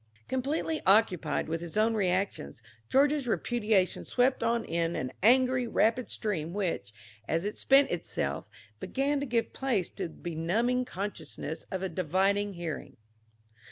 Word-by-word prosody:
Completely 290 +4 -1
occupied 185 -7 +3
with 165 +1 -2
his 170 +3 -5
own 220 +1 +3
reactions, 185 - -1 0.3
George's 280 0 +3
repudiation 215 -5 +1
swept 255 +1 +1
on 230 0 +1
in 170 0 -1
an 130 - -3
angry, 250 +3 +4
rapid 230 +2 +1
stream 170 -7 -2
which, 170 - -2 0.4
as 165 +3 0
it 210 - -4
spent 275 +1 +5
itself, - - -3 0.3
began 280 +2 0
to 280 - -3
give 230 -2 0
place 240 -10 -1
to 190 -3 -4
the 160 - -14
benumbing 210 +10 0
consciousness 170 -6 -5
of 190 0 -3
a - - 0
divided 190 +4 +1
hearing. 170 -3 -6
205 Hz, 140 wpm, -29 LUFS, 170-250 Hz, 0.4 s, spent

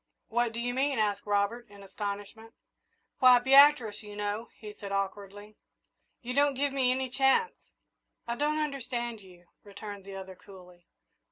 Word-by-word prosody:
"What 240 0 0
do 230 - -6
you 245 +1 -2
mean?" 275 +1 0
asked 210 -1 -1
Robert, 205 +3 -1
in 200 -1 -14
astonishment. 205 +3 -7 0.6
"Why, 255 -2 +8
Beatrice, 265 -4 +5
you 210 -1 -10
know," 210 +2 -3
he 210 -1 -9
said 200 -1 -9
awkwardly; 200 +1 -5 0.7
"you 250 +1 -4
don't 285 +1 +2
give 280 +1 0
me 260 -2 +2
any 260 +1 0
chance." 270 - +2 0.7
"I 235 - -1
don't 300 +4 0
understand 250 -6 -3
you," 180 -2 -17 0.2
returned 205 0 -9
the 195 0 -9
other, 190 0 -8
coolly. 180 -3 -16
220 Hz, 155 wpm, -29 LUFS, 200-255 Hz, 0.7 s, Why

